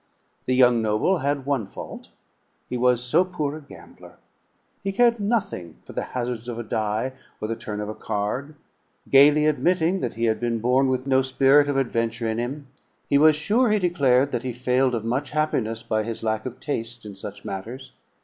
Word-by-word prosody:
The 130 - +1
young 125 -2 +5
noble 110 - +1
had 140 -1 -1
one 135 -8 -1
fault, - - -9 0.6
he - - -4
was 125 0 +2
so 150 +8 +3
poor 155 -6 -3
a - - -11
gambler. 140 - -15 0.6
He 195 - -2
cared 235 +3 +3
nothing 200 - -2
for - - -11
the - - -2 0.2
hazards 120 -1 -3
of 120 - -5
a 120 - -4
die 110 +4 -2 0.3
or 110 - -3
the 115 - -2
turn 110 -2 -6
of 105 - -4
a 110 - -4
card. 110 +9 -3 0.6
Gayly 145 +2 +6
admitting 175 +4 +2
that 125 - -3
he 115 - -3
had 110 -1 +1
been 120 -1 -1
born 125 +4 +2
with 130 0 -1
no 130 -1 +3
spirit 135 +2 +4
of 140 - 0
adventure 115 -3 -1
in 110 +1 -1
him, 135 +5 -4 0.4
he 140 - +4
was 155 0 +6
sure, 215 +11 +2
he 210 - +3
declared, 140 -8 +2
that 120 - -1
he 130 -1 -4
failed 125 +1 +1
of 115 -1 -4
much 130 +4 -1
happiness 120 -7 -1
by 110 -1 0
his 115 +1 -5
lack 110 +2 -1
of 130 0 -8
taste 120 -5 -4
in 105 - -8
such 100 +1 -8
matters. 120 +7 -7
125 Hz, 195 wpm, -24 LUFS, 115-145 Hz, 0.6 s, Gayly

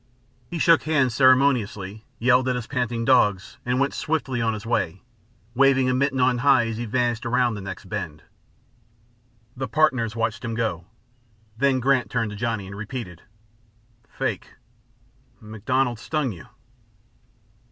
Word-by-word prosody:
He 175 - -4
shook 165 0 +5
hands 140 -6 +1
ceremoniously, 120 -6 +2
yelled 125 +2 +3
at 125 - 0
his 125 -2 -4
panting 120 -3 -2
dogs, 105 -7 +2
and 125 +1 0
went 140 0 +1
swiftly 140 -6 -2
on 115 -1 0
his 105 +1 -8
way, 95 -5 -1 0.5
waving 130 0 +3
a - - +1
mitten 135 +1 0
on 125 -1 +3
high 135 -2 +4
as 115 -1 -4
he 120 - -3
vanished 120 +1 0
around 125 0 +1
the 105 - -6
next 95 0 -8
bend. 85 -7 -5 1.3
The 130 0 -4
partners 130 -8 +1
watched 115 0 -2
him 115 -2 -3
go, 95 -7 -2 0.7
then 135 +2 +2
Grant 130 0 +2
turned 115 -3 -1
to - - -7
Johnny, 110 -2 -2
and 100 +1 -9
repeated: 105 -5 -7 0.9
"Fake! - - -4 0.8
MacDonald 115 +3 -1
stung 150 -1 -2
you." 90 +3 -11
120 Hz, 145 wpm, -24 LUFS, 110-130 Hz, 1.3 s, shook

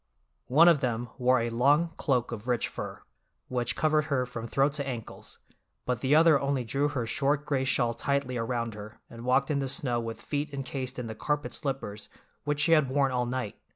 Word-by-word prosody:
One 155 +7 +6
of 170 -4 +6
them 120 -2 -2
wore 125 0 +4
a 115 0 -2
long 145 +8 +3
cloak 125 -6 0
of 115 0 -7
rich 120 -2 +1
fur, - - -7 0.5
which 125 -2 -1
covered 155 -1 +2
her 140 -4 0
from 120 -2 -6
throat 135 +4 +2
to 140 -2 -3
ankles, 120 -4 -7 0.5
but 125 -3 -1
the 135 +3 +3
other 160 -2 +6
only 140 -2 0
drew 135 +6 0
her 135 -5 -2
short 140 +5 0
gray 140 -3 0
shawl 120 -3 +1
tightly 140 +1 -1
around 115 -1 -2
her 105 +2 -10
and 115 +1 -9
walked 135 +3 +2
in 140 - +1
the 135 - -1
snow 125 -3 0
with 115 -1 -5
feet 145 0 -3
encased 130 -1 -4
in 125 - -4
the 110 - -5
carpet 150 +7 -2
slippers 130 -7 -3 0.4
which 145 0 -1
she 165 - +3
had 155 -5 +5
worn 135 0 +2
all 125 -1 0
night. 125 -4 -4
130 Hz, 205 wpm, -28 LUFS, 120-145 Hz, 0.5 s, One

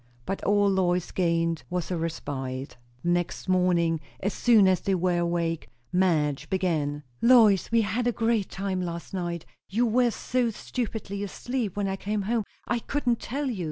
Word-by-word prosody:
But 195 - -3
all 205 0 +3
Lois 180 -2 +2
had - - -13
gained 165 -2 +1
was 180 0 -2
a - - +1
respite. 140 -5 -4 0.3
The 175 - 0
next 175 +1 -1
morning, 175 -3 +2 0.2
as 200 +2 -1
soon 220 -5 +5
as 185 -2 +3
they 195 - +1
were 180 -1 +1
awake, 170 -1 -1 0.2
Madge 160 -6 +1
began. 155 -6 0 0.2
"Lois, 225 -7 +6
we 230 0 +4
had 225 +4 0
a - - +3
grand 225 -3 0
time 190 -1 -2
last 170 +1 -5
night! 175 -3 -3 0.2
You 230 +5 +2
were 240 +2 +3
so 245 +1 0
stupidly 220 -3 -4
asleep 225 +1 -3
when 200 -1 0
I 190 0 -2
came 205 +1 -2
home, 220 +1 0 0.2
I 240 - +1
couldn't 245 -2 0
tell 285 +5 -3
you. 215 - -5
190 Hz, 175 wpm, -27 LUFS, 170-220 Hz, 0.3 s, Lois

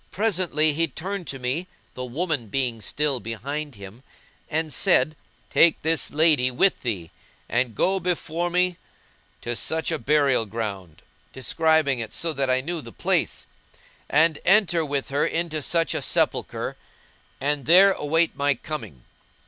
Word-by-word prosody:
Presently 175 -7 +1
he 165 +3 +1
turned 190 +1 -5
to 135 - -4
me 135 +8 -3 0.3
(the 125 - -6
woman 140 -1 -2
being 120 -1 -2
still 145 +3 0
behind 140 +6 -5
him) 100 +4 -11 0.5
and 155 -1 -2
said, 140 +4 +3 0.4
"Take 170 - +4
this 160 +1 +2
lady 150 -4 +3
with 175 +10 +2
thee 95 -10 -4 0.4
and 120 -2 -1
go 190 - +2
before 175 -1 -2
me 180 0 +1 0.6
to 120 0 -3
such 160 +7 0
a 160 - -2
burial 135 -3 +2
ground" 100 -6 -6 0.3
(describing 150 +1 +1
it, 110 -2 -6
so 165 -1 0
that 135 -2 -1
I 130 0 +2
knew 165 +3 -3
the 115 - -11
place), - - -1 0.6
"and 155 +1 +3
enter 185 -4 +4
with 140 -2 -3
her 140 +2 0
into 165 -2 -2
such 165 +3 +1
a - - -1
sepulchre[FN#190] - - 0 0.6
and 145 -1 0
there 190 +4 +8
await 165 0 0
my 140 -1 +1
coming." 110 - -8
150 Hz, 150 wpm, -24 LUFS, 125-165 Hz, 0.6 s, there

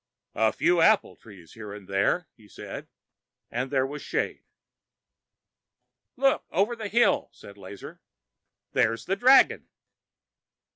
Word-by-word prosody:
"A 110 -1 +2
few 175 0 +2
apple 215 +5 +3
trees 95 -7 -16
here 105 -2 -9
and 100 -3 -12
there," 100 - 0
he 110 -3 -20
said, - - -9 0.6
and 125 +3 -3
there 130 -1 +1
was 145 +2 -7
shade. - - -3 1.7
"Look 270 +1 +2
over 205 +6 0
the 220 -2 -6
hill!" 240 +6 +2
said 100 - -14
Lazar. 100 0 -11 0.7
"There's 115 +1 0
the 195 - 0
dragon!" 260 +5 +4
140 Hz, 125 wpm, -26 LUFS, -, 1.7 s, dragon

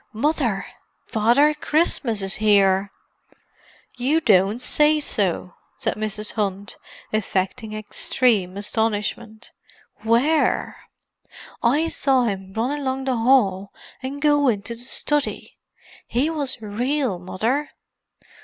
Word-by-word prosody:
"Mother! 235 -5 0 0.4
Father 240 +8 +3
Christmas 295 - +1
is 195 - -1
here!" 200 -2 +3 1.0
"You 270 +6 +1
don't 205 - +3
say 300 +4 +3
so!" 190 - -2 0.2
said - - -1
Mrs. 215 -1 -3
Hunt, 200 -2 -3 0.4
affecting 215 +2 -2
extreme 215 -2 0
astonishment. 215 +1 -2 0.5
"Where?" 240 +9 +1 0.8
"I 290 +7 +2
saw 270 -5 +1
him 195 -4 -3
run 250 +7 -1
along 265 -1 -2
the 260 -2 0
hall 205 -6 +2 0.3
and 265 +2 -5
go 290 -1 +3
into 210 -1 -1
the 230 - -9
study. 285 +3 -2 0.5
He 270 +7 0
was 285 -6 -2
real, 240 0 -1
Mother!" 225 +11 -2
230 Hz, 105 wpm, -22 LUFS, 205-275 Hz, 1.0 s, Father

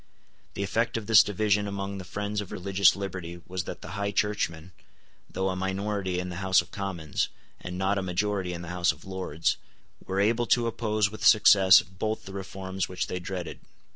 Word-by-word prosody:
The 100 - -2
effect 115 +4 0
of 110 - -5
this 110 0 +8
division 105 0 +1
among 100 0 -4
the - - -6
friends 105 +3 -3
of 100 - -9
religious 100 +1 +3
liberty 95 -3 -6
was 90 -1 -4
that - - -7
the - - -8
High 100 +1 -2
Churchmen, 95 -5 -1 0.6
though 95 0 -1
a 95 - -2
minority 95 0 -2
in 90 0 -4
the 90 - -6
House 95 0 +3
of - - -4
Commons, 90 -7 -2 0.3
and 90 0 -6
not 95 +2 +1
a - - -2
majority 95 0 -1
in 85 -1 -5
the 85 - -7
House 90 -1 +2
of - - -14
Lords, 95 -4 -1 0.5
were 95 +1 -2
able 115 +4 +2
to 120 -1 +3
oppose 110 -3 0
with 110 - -8
success 100 -3 +7
both 110 +5 -4
the 95 - -9
reforms 95 -1 -4
which 90 0 -2
they 90 - -4
dreaded. 90 0 -5
95 Hz, 195 wpm, -27 LUFS, 90-105 Hz, 0.6 s, this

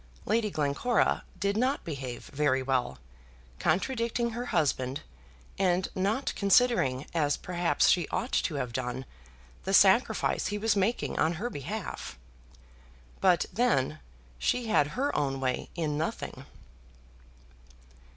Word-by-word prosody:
Lady 220 0 +1
Glencora 155 +9 +1 0.2
did 200 0 0
not 255 +5 +1
behave 135 -6 -6
very 135 -2 +2
well, 130 - 0 0.6
contradicting 235 +6 0
her 240 +2 -4
husband, 140 - 0 0.6
and 185 -1 +2
not 205 +8 0
considering, 200 - +3
as, 150 -4 +1
perhaps, 175 -1 +1
she 175 -4 +3
ought 245 - -3
to 160 - 0
have 125 -4 -3
done, 125 +1 -3 0.6
the 195 +1 +2
sacrifice 210 +3 +4
he 205 +2 -2
was 220 0 +1
making 205 +4 0
on 160 +2 +3
her 220 +9 -4
behalf. 95 - -5 1.0
But, 180 -3 +4
then, 155 - +1 0.4
she 230 - 0
had 150 -9 +4
her 280 +3 0
own 135 -2 0
way 130 -1 -2
in 155 -4 -1
nothing. 160 - -4
175 Hz, 120 wpm, -29 LUFS, 140-220 Hz, 1.0 s, sacrifice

